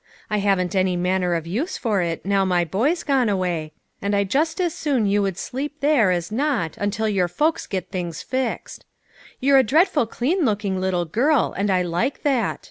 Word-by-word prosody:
I 210 - +2
haven't 195 -2 +1
any 185 -1 +2
manner 180 0 0
of 165 -1 -3
use 240 - -3
for 210 -6 0
it, 170 -1 -3
now 195 0 +2
my 180 -2 +1
boy's 255 - 0
gone 265 -6 +2
away, 175 -5 -1 0.3
and 200 0 0
I 200 - +3
just 310 - 0
as 350 -3 0
soon 270 -7 0
you 205 +1 +2
would 195 -3 -1
sleep 290 +7 -5
there 280 -9 +3
as 175 +1 -1
not 245 - -1
until 205 +2 -1
your 195 -4 +1
folks 310 - 0
get 185 -2 -4
things 175 -4 -4
fixed. 260 -2 -3 0.6
You're 275 +1 +5
a - - +5
dreadful 300 - +2
clean 315 - 0
looking 205 -5 0
little 180 -2 0
girl, 250 - +1
and 200 +1 -1
I 185 -1 +2
like 175 +10 -2
that. 260 -7 0
205 Hz, 195 wpm, -22 LUFS, 180-270 Hz, 0.6 s, You're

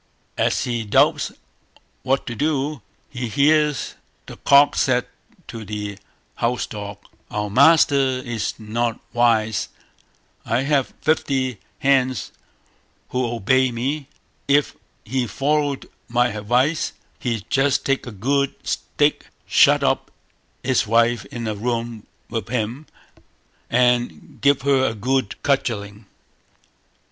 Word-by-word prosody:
As - - +1
he 120 -2 -2
doubts 105 - +2 0.7
what 135 +1 0
to 120 - -4
do, 145 +2 -1 0.3
he 125 -2 -4
hears 150 +3 +2 0.3
the - - -10
cock 140 +1 +5
say 125 -2 +2 0.4
to 115 -1 -7
the 105 -1 -5 0.4
house 125 +1 0
dog 100 -1 -7 0.3
"Our 105 -1 -3
master 145 +4 +6 0.2
is 120 -3 -3
not 115 +1 -2
wise; 110 -3 +2 0.7
I 120 +3 0
have 140 -2 0
fifty 130 -6 0 0.2
hens 130 -6 +1 0.8
who 125 -1 0
obey 130 +3 +2
me; 135 +5 -3 0.4
if 145 0 +2 0.3
he 125 +2 -1
followed 145 +4 0 0.2
my 120 0 +2
advice, 125 +9 0 0.3
he'd 115 -4 -3
just 135 +1 +2
take 135 -2 0
a - - -5
good 135 +7 0
stick, - - 0 0.2
shut - - +5
up - - +1 0.5
his 125 -4 +1
wife 115 +1 +2
in 115 -2 -5
a 110 - -1
room 115 0 -3 0.2
with 115 -3 -4
him, 125 +5 -3 0.8
and 125 0 +1
give 140 -2 +3
her 140 -2 +3
a 115 - 0
good 125 0 0
cudgelling." 105 -7 -1
125 Hz, 115 wpm, -22 LUFS, 115-140 Hz, 0.8 s, master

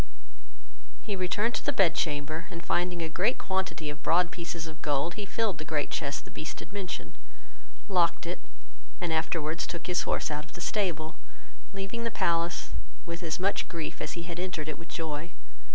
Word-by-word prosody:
He 210 -3 -1
returned 200 +5 +2
to - - -1
the - - +3
bed 190 -10 +6
chamber, 155 0 0
and 170 -3 -6
finding 175 -1 +2
a - - +1
great 190 +9 +3
quantity 190 -4 0
of 150 0 -9
broad 175 +1 +5
pieces 170 -1 -3
of 160 -1 -8
gold, 145 +3 +2
he 205 -2 -4
filled 205 -7 +1
the - - -2
great 155 -2 0
chest 140 -2 -1
the - - -11
Beast 155 - -4
had - - -9
mentioned, 195 -3 -3 0.7
locked 175 -5 +4
it, 175 +2 -2 0.6
and 175 -2 +1
afterwards 160 0 +1
took 170 - -4
his 180 0 +3
horse - - +1
out 150 0 -1
of 160 - -16
the - - -7
stable, 175 -5 +1 0.5
leaving 195 +4 -3
the 230 - +2
palace 170 -4 +2 0.3
with 170 +1 -4
as 165 -1 -1
much 195 +2 +2
grief 165 -3 -3
as - - -1
he 170 - -3
had 170 0 -4
entered 180 -4 -1
it 155 - -3
with 165 - -9
joy. 160 0 -3
170 Hz, 190 wpm, -31 LUFS, 160-185 Hz, 0.7 s, bed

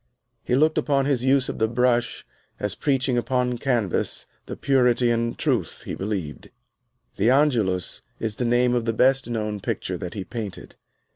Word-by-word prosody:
He 125 - +1
looked 155 +3 +3
upon 140 -2 +1
his 135 -4 0
use 135 0 +3
of - - -5
the 110 - +3
brush 120 0 0 0.3
as 105 -2 -2
preaching 130 -2 0
upon 125 -1 -1
canvas 120 -8 -1 0.2
the - - -6
purity 125 -3 +3
and 115 0 -1
truth - - -1
he - - -4
believed. 95 -9 -4 0.7
"The 105 +4 +3
Angelus" 115 -10 +1 0.2
is 110 -2 -3
the 125 - -1
name 120 +1 +3
of 120 -2 0
the 115 - 0
best 130 +2 +2
known 105 -3 -2
picture - - -3
that 90 +2 -6
he 100 - -3
painted. 105 -2 -7
120 Hz, 165 wpm, -24 LUFS, 110-130 Hz, 0.7 s, looked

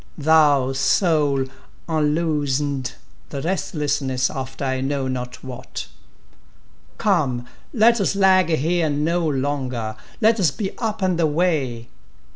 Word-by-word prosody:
Thou, 145 -4 +4
Soul, 145 -2 +2 0.4
unloosen'd—the 150 -4 -2
restlessness 145 -7 -1
after 135 +1 -5
I 130 -1 -1
know 135 0 -1
not 125 -1 -5
what; 125 - -7 1.1
Come! 145 - +1 0.3
let 235 -2 +4
us 195 - +1
lag 190 -3 +4
here 165 +1 +1
no 160 +4 0
longer—let 135 - -1
us 175 -5 +4
be 195 +7 -4
up 220 -4 -2
and 185 -2 +1
away! 150 -7 0
150 Hz, 100 wpm, -22 LUFS, 130-175 Hz, 1.1 s, Thou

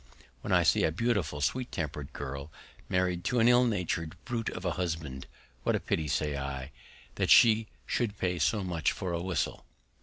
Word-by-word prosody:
When - - -4
I - - +5
see - - +4
a 80 - +3
beautiful, 95 -7 0
sweet 125 - -1
tempered 75 -3 -4
girl 70 +2 -6 0.4
married 90 -1 +1
to 125 +2 +1
an 115 - +5
ill 125 +1 +6
natured 90 -7 -1
brute 115 -3 -2
of 90 - -7
a 90 - +1
husband, 80 -6 -3 0.3
What - - +1
a - - +1
pity, 80 - -1
say 75 0 0
I, 70 0 -4 0.5
that - - +2
she 110 -1 +7 0.2
should 105 -5 -1
pay 90 -2 -1
so 105 +5 +2
much 85 -3 0
for 95 -3 -4
a 85 - -1
whistle! 90 0 -2
90 Hz, 185 wpm, -30 LUFS, 75-105 Hz, 0.5 s, she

